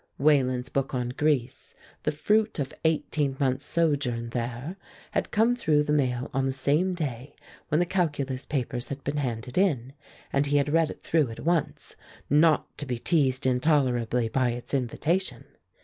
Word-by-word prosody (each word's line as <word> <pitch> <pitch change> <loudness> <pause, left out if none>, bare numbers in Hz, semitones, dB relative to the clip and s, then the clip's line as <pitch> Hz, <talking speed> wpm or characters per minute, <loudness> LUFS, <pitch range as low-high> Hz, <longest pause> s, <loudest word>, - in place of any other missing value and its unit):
Wayland's 130 -3 +2
book 135 -1 -1
on 125 -1 -1
Greece, 140 -2 -1 0.3
the - - 0
fruit 210 +8 +1
of 140 -2 -3
eighteen 150 -3 0
months' 135 0 0
sojourn 140 -8 0
there, 125 +7 -4 0.4
had - - -1
come 230 +3 +3
through 155 -11 +2
the 150 - 0
mail 130 -4 +1
on 135 0 +1
the - - 0
same 150 +8 +1
day 140 -5 -5 0.3
when 150 - +1
the 175 - +3
calculus 145 -8 -1
papers 125 -3 -3
had 140 0 -6
been 145 +1 -2
handed 125 +1 -2
in, 135 -10 +1 0.4
and 140 +1 +2
he 145 +1 +2
had 145 0 +1
read 165 -1 +3
it - - -9
through 155 -6 +2
at 115 - -8
once, 170 -2 -1 0.3
not 155 +1 +3
to 145 - -3
be 125 -2 -2
teased 135 -2 +1
intolerably 125 -3 +2
by 130 +2 +1
its 120 +3 -8
invitation. 150 +8 -1
140 Hz, 165 wpm, -27 LUFS, 125-155 Hz, 0.4 s, come